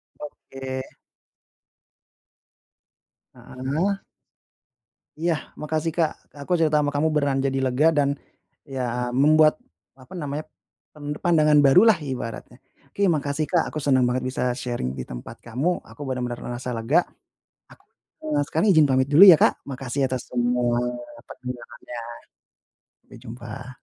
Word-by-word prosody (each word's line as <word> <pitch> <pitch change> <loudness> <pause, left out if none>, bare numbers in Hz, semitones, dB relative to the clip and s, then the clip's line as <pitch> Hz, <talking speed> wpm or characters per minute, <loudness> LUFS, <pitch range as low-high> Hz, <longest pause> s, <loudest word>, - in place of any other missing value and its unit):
Oke. 135 -2 -7 2.5
Heeh. 150 +10 -2 1.2
Iya. 165 0 +1 0.3
Makasih 155 +1 -1
Kak. 160 -3 +2 0.3
Aku - - -9
cerita 155 -2 +3
sama 145 -1 0
kamu 155 +2 +1
beneran 140 -2 +1
jadi 135 0 -1
lega 135 +4 +3
dan 145 -3 +1 0.5
ya 125 -3 -3
membuat, 155 - +4 0.3
apa 135 +7 -18
namanya, 150 -2 -4 0.5
pen 145 0 -5
pandangan 155 -4 +4
baru 145 +9 +6
lah 210 -7 +5
ibaratnya. 130 -5 -6 0.3
Oke, 200 - -1
makasih 145 0 -1
Kak 170 +1 0
aku - - -11
senang 130 -3 +3
banget 125 +1 -1
bisa 130 - -3
sharing 120 - -4
di 65 - -5
tempat - - -9
kamu, 135 +10 -2
aku - - -17
benar-benar 125 -2 -3
merasa 120 +1 -5
lega. 125 +10 +2 0.7
Ak - - -17 0.7
sekarang 160 +7 +1
izin 155 - +6
pamit 130 0 +3
dulu 150 +5 +5
ya, 185 -6 +10
Kak. - - +2
Makasih 135 0 -2
atas 130 -1 -3
semua 120 0 +1 0.4
penjelasannya, 120 -1 -9 1.0
sampai - - -15
jumpa. 125 +2 -9
135 Hz, 125 wpm, -24 LUFS, 125-155 Hz, 2.5 s, ya